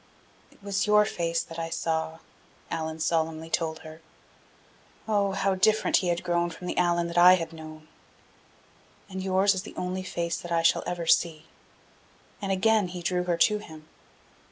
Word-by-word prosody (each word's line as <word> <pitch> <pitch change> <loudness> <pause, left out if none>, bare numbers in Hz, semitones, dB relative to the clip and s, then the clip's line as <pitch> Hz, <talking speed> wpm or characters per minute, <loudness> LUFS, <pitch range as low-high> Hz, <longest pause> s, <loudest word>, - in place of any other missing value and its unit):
"It - - -24
was 200 0 -1
your 210 0 +5
face 170 -3 -1
that 165 0 -9
I 165 0 -3
saw," 160 -1 -2 0.5
Allan 160 -1 -3
solemnly 160 0 -1
told 160 -2 -1
her 155 +1 -11 1.1
oh, 200 -2 +1
how 195 0 +1
different 215 +3 +3
he 185 - -1
had 175 0 -1
grown 175 -1 0
from 170 +2 -10
the - - -3
Allan 175 -1 +2
that 170 0 0
I 180 +1 +9
had 165 -2 -5
known! 155 -1 -11 1.2
"and 190 -1 -6
yours 190 +1 +3
is 190 - -3
the 215 - -11
only 180 +1 -3
face 170 -2 -3
that 175 - -9
I 165 -1 +1
shall 165 - +4
ever 175 -1 -3
see." 160 -1 +2 1.0
And 195 -1 -2
again 210 +1 +2
he 175 0 -7
drew 180 0 0
her 175 -1 0
to 210 +5 +3
him. 155 -6 -12
175 Hz, 175 wpm, -27 LUFS, 165-190 Hz, 1.2 s, I